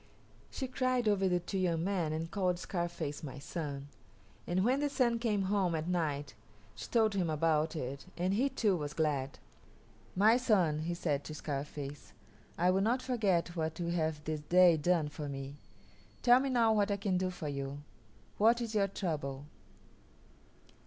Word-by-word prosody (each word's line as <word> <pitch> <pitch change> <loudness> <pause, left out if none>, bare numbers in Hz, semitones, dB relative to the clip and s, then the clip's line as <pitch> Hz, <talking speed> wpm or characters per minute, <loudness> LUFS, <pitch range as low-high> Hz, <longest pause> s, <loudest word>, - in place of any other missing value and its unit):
She 265 - -4
cried 255 -2 0
over 195 -2 +3
the 180 0 +2
two 190 +3 -4
young 170 -3 +1
men 180 -5 0
and 160 +2 -3
called 180 -2 0
Scarface 170 -5 -3
"My 145 -3 -7
son," 140 -1 -5 0.6
and 185 +3 +1
when 260 +3 +3
the 290 0 0
Sun 240 -4 +1
came 215 -4 0
home 190 -3 +1
at 160 +1 -3
night 150 -5 -1 0.4
she 110 0 -8
told 220 -2 +2
him 185 -4 0
about 155 0 +1
it, 140 +1 -5
and 180 +2 0
he 255 +7 +2
too 220 -7 +1
was 150 -3 -4
glad. 140 -4 -1 0.8
"My 215 +5 +5
son," 190 -12 +2
he 170 +2 -2
said 150 -5 -1
to 155 - -6
Scarface, 145 -1 -5 0.4
"I 180 +2 +3
will 190 +1 +2
not 240 +5 +1
forget 195 -9 0
what 160 -1 -2
you 170 -1 -2
have 160 -3 -1
this 155 0 -2
day 175 +2 +6
done 160 0 +1
for 150 0 -6
me. 135 +1 -6 0.7
Tell 245 +1 +7
me 275 +1 -1
now 230 -3 +3
what 210 -1 +2
I 200 - 0
can 195 -2 0
do 185 0 0
for 175 -4 -6
you; 140 0 -4 0.6
what 230 +3 +5
is 230 -2 -4
your 200 -2 +2
trouble?" 145 -8 -4
175 Hz, 175 wpm, -33 LUFS, 150-205 Hz, 0.8 s, Tell